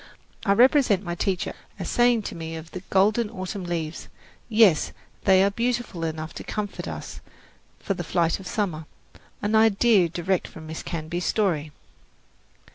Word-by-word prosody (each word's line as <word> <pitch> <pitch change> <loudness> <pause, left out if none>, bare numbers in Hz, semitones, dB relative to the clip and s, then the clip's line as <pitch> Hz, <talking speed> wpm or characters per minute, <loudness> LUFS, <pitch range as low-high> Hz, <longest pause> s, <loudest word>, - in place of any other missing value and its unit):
I 200 - +6
represent 245 -3 +4
my 175 -2 -3
teacher 180 +1 -1 0.2
as - - -5
saying 240 -2 +3
to - - -5
me 165 -1 -5
of 160 +1 -9
the 185 - -5
golden 210 +4 +3
autumn 185 0 -5
leaves, 165 -2 -4 0.4
"Yes, 215 -8 +4 0.3
they 190 -1 +6
are 200 - +3
beautiful 235 -5 -2
enough 155 0 -4
to - - -7
comfort 210 -2 -4
us - - -7 0.6
for 195 - -2
the 175 - -5
flight 170 +1 +1
of 190 - -9
summer" 175 -7 -2 0.6
an 205 +2 0
idea 220 -3 +5
direct 175 +2 -1
from 160 - -11
Miss 160 +1 -6
Canby's 170 +2 -4
story. 165 -8 0
190 Hz, 155 wpm, -25 LUFS, 165-210 Hz, 0.6 s, I